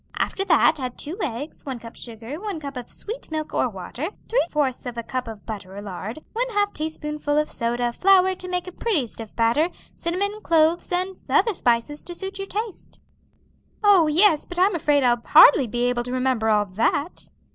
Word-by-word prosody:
After 390 Hz, -, -1 dB
that 320 Hz, -3 st, +4 dB
add 255 Hz, -2 st, -4 dB
two 310 Hz, +5 st, -5 dB
eggs, 280 Hz, +1 st, -4 dB
one 265 Hz, -3 st, -5 dB
cup 230 Hz, 0 st, -11 dB
of -, -, -18 dB
sugar, 235 Hz, +5 st, -8 dB
one 405 Hz, -4 st, -4 dB
cup 280 Hz, -2 st, -7 dB
of 245 Hz, -1 st, -7 dB
sweet 450 Hz, +4 st, -8 dB
milk 310 Hz, -1 st, -4 dB
or 255 Hz, -, +1 dB
water, 220 Hz, -, -5 dB, 0.2 s
three -, -, +2 dB
fourths 270 Hz, -4 st, -1 dB
of 240 Hz, -1 st, -6 dB
a 235 Hz, -, -3 dB
cup 255 Hz, +1 st, -4 dB
of 220 Hz, -3 st, -9 dB
butter 200 Hz, -4 st, -7 dB
or -, -, -5 dB
lard, 200 Hz, +4 st, -6 dB, 0.2 s
one -, -, -1 dB
half 410 Hz, 0 st, +1 dB
teaspoonful 300 Hz, -1 st, -3 dB
of 300 Hz, 0 st, +1 dB
soda, 240 Hz, +1 st, -1 dB
flour 375 Hz, +2 st, +4 dB
to 365 Hz, 0 st, -8 dB
make 360 Hz, -1 st, -2 dB
a 365 Hz, -, -7 dB
pretty 360 Hz, -, 0 dB
stiff 225 Hz, -1 st, -9 dB
batter, 235 Hz, +9 st, +2 dB, 0.3 s
cinnamon, 400 Hz, +5 st, -2 dB
cloves, 330 Hz, 0 st, +2 dB
and 370 Hz, +1 st, -1 dB
other 445 Hz, +2 st, +3 dB
spices 245 Hz, -1 st, 0 dB
to 350 Hz, -, -6 dB
suit 390 Hz, +2 st, -5 dB
your 390 Hz, -, -4 dB
taste." 425 Hz, -1 st, -6 dB, 0.8 s
"Oh, 390 Hz, -6 st, +6 dB
yes! 320 Hz, +1 st, +4 dB
but 355 Hz, -, -4 dB
I'm 380 Hz, +3 st, +4 dB
afraid 295 Hz, -4 st, +2 dB
I'll 240 Hz, -1 st, +3 dB
hardly 275 Hz, -3 st, +7 dB
be 240 Hz, +2 st, -2 dB
able 245 Hz, -1 st, +1 dB
to 250 Hz, -, -5 dB
remember 255 Hz, -3 st, +1 dB
all 210 Hz, -1 st, +3 dB
that." 280 Hz, -, -1 dB
300 Hz, 200 wpm, -23 LUFS, 240-365 Hz, 0.8 s, hardly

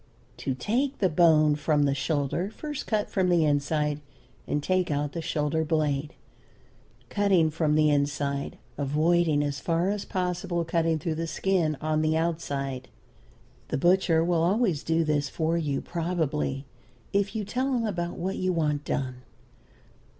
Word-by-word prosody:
To 130 Hz, -, -2 dB
take 255 Hz, -, -1 dB
the 190 Hz, -, +2 dB
bone 155 Hz, -2 st, +5 dB
from 150 Hz, 0 st, +1 dB
the 140 Hz, -1 st, +2 dB
shoulder, 145 Hz, +5 st, -1 dB
first 295 Hz, +5 st, -6 dB
cut 215 Hz, -2 st, 0 dB
from 185 Hz, -2 st, +1 dB
the 170 Hz, -3 st, +4 dB
inside 150 Hz, 0 st, 0 dB, 0.5 s
and 145 Hz, -, -1 dB
take 185 Hz, +1 st, +1 dB
out 145 Hz, -1 st, -1 dB
the 165 Hz, -, -4 dB
shoulder 160 Hz, -1 st, 0 dB
blade, 150 Hz, -2 st, -1 dB, 0.9 s
cutting 190 Hz, -6 st, +3 dB
from 150 Hz, -1 st, +1 dB
the 155 Hz, -1 st, +4 dB
inside, 140 Hz, -1 st, -1 dB, 0.2 s
avoiding 155 Hz, +2 st, +2 dB
as 145 Hz, -1 st, -2 dB
far 170 Hz, +5 st, 0 dB
as 205 Hz, -1 st, -3 dB
possible 180 Hz, -1 st, -2 dB
cutting 165 Hz, 0 st, +1 dB
through 160 Hz, +2 st, -2 dB
the 165 Hz, +1 st, -3 dB
skin 165 Hz, -3 st, 0 dB
on 155 Hz, 0 st, +1 dB
the 155 Hz, 0 st, +2 dB
outside. 140 Hz, -6 st, -2 dB, 0.8 s
The -, -, -1 dB
butcher 175 Hz, +1 st, +3 dB
will 170 Hz, -1 st, +2 dB
always 185 Hz, -, +2 dB
do 165 Hz, +1 st, +1 dB
this 150 Hz, -2 st, 0 dB
for 160 Hz, +3 st, 0 dB
you 150 Hz, -5 st, -1 dB
probably, 160 Hz, -5 st, -2 dB, 0.5 s
if 200 Hz, +1 st, +1 dB
you 215 Hz, -2 st, -2 dB
tell 255 Hz, +6 st, -1 dB
him 235 Hz, -2 st, 0 dB
about 175 Hz, -5 st, -3 dB
what 190 Hz, +3 st, -2 dB
you 185 Hz, 0 st, 0 dB
want 150 Hz, -4 st, 0 dB
done. 130 Hz, -3 st, -2 dB
160 Hz, 155 wpm, -27 LUFS, 145-180 Hz, 0.9 s, bone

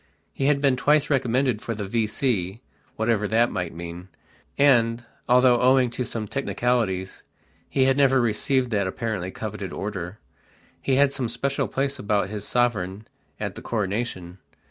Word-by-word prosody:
He 135 Hz, -, -2 dB
had 140 Hz, -1 st, +3 dB
been 135 Hz, -3 st, +3 dB
twice 150 Hz, +3 st, +2 dB
recommended 125 Hz, -3 st, +1 dB
for 115 Hz, -, -4 dB
the 105 Hz, -2 st, -4 dB
V.C., 110 Hz, -2 st, -1 dB, 0.4 s
whatever 110 Hz, -2 st, +1 dB
that 115 Hz, +3 st, +2 dB
might 90 Hz, -2 st, -3 dB
mean, 85 Hz, +1 st, -8 dB, 0.5 s
and, 120 Hz, -4 st, +3 dB, 0.2 s
although 125 Hz, -1 st, +5 dB
owing 130 Hz, -1 st, +4 dB
to 125 Hz, +1 st, -3 dB
some 110 Hz, -2 st, -4 dB
technicalities 115 Hz, -7 st, -1 dB, 0.5 s
he 135 Hz, -, +2 dB
had 135 Hz, +1 st, +3 dB
never 135 Hz, -2 st, +4 dB
received 120 Hz, +2 st, +1 dB
that 100 Hz, -3 st, +1 dB
apparently 100 Hz, -2 st, -3 dB
coveted 105 Hz, -2 st, -6 dB
order, 95 Hz, -2 st, -5 dB, 0.6 s
he 135 Hz, -, +1 dB
had 140 Hz, 0 st, +4 dB
some 125 Hz, -4 st, -2 dB
special 135 Hz, +3 st, -1 dB
place 140 Hz, +1 st, -2 dB
about 100 Hz, -2 st, 0 dB
his 105 Hz, -1 st, -4 dB
sovereign 110 Hz, -5 st, 0 dB, 0.3 s
at -, -, -3 dB
the -, -, -9 dB
coronation. 100 Hz, -4 st, -3 dB
115 Hz, 150 wpm, -24 LUFS, 100-130 Hz, 0.6 s, although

